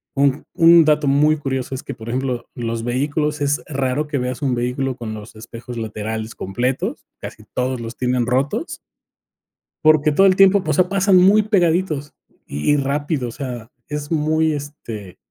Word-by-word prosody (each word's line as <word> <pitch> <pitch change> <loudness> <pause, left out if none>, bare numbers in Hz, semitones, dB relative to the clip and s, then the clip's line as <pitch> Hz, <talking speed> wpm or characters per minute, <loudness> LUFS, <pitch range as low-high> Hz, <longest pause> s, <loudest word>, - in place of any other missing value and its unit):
Un 140 0 +1
un 165 0 +6
dato 150 -1 +2
muy 150 +3 +4
curioso 130 -2 -3
es 130 - -7
que, - - -6
por 110 - -11
ejemplo, 125 -1 -2
los 115 -1 -3
vehículos 145 +5 -1
es 145 0 +1
raro 140 +1 -1
que 150 -1 -2
veas 125 +2 -3
un 135 -3 0
vehículo 125 +2 -2
con 115 -3 -5
los 110 +1 -10
espejos 115 +2 -9
laterales 110 0 -4
completos, 125 +7 -2
casi - - -9
todos 125 -1 -1
los 115 +1 -7
tienen 125 -1 0
rotos. 135 - 0 1.2
Porque 155 -1 +4
todo 195 +6 +5
el 185 -1 +3
tiempo, 195 0 +5
o 155 - +1
sea, 180 +5 +3
pasan 195 -1 +3
muy 195 +4 +6
pegaditos 175 -7 +1 0.3
y 75 - -1
y - - +3
rápido, 140 -1 -1
o - - -6
sea, 120 -3 -6 0.2
es 150 +1 -5
muy, 155 0 +1
este 115 - -7
140 Hz, 170 wpm, -20 LUFS, 120-155 Hz, 1.2 s, un